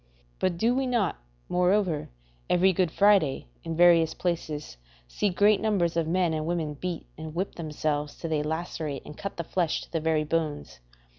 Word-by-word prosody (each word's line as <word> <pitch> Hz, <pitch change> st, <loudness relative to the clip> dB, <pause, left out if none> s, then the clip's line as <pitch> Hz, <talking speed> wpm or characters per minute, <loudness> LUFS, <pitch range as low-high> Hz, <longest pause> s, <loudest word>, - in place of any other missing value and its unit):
But 185 Hz, -2 st, 0 dB
do 230 Hz, +6 st, +2 dB
we 265 Hz, +1 st, 0 dB
not, 235 Hz, -7 st, +1 dB, 0.3 s
moreover, 180 Hz, -3 st, +1 dB, 0.4 s
every 185 Hz, +2 st, +4 dB
Good 180 Hz, -1 st, +2 dB
Friday, 195 Hz, -6 st, +3 dB, 0.2 s
in 165 Hz, -, -4 dB
various 170 Hz, -2 st, +5 dB
places, 155 Hz, -, -3 dB, 0.3 s
see -, -, 0 dB
great 205 Hz, +3 st, +3 dB
numbers 185 Hz, -6 st, +1 dB
of 165 Hz, -2 st, +1 dB
men 175 Hz, -1 st, +1 dB
and 155 Hz, 0 st, -2 dB
women 165 Hz, -3 st, -1 dB
beat 175 Hz, +3 st, -5 dB
and 155 Hz, 0 st, -7 dB
whip 190 Hz, +3 st, -2 dB
themselves 150 Hz, -2 st, -3 dB
till 165 Hz, -, -5 dB
they 150 Hz, -1 st, +1 dB
lacerate 155 Hz, -2 st, -3 dB
and 150 Hz, -, -9 dB
cut 200 Hz, +4 st, -6 dB
the 170 Hz, -, -2 dB
flesh 170 Hz, -1 st, 0 dB
to -, -, -16 dB
the 165 Hz, -, 0 dB
very 160 Hz, -1 st, +1 dB
bones? 150 Hz, -, -2 dB
170 Hz, 175 wpm, -27 LUFS, 155-185 Hz, 0.4 s, various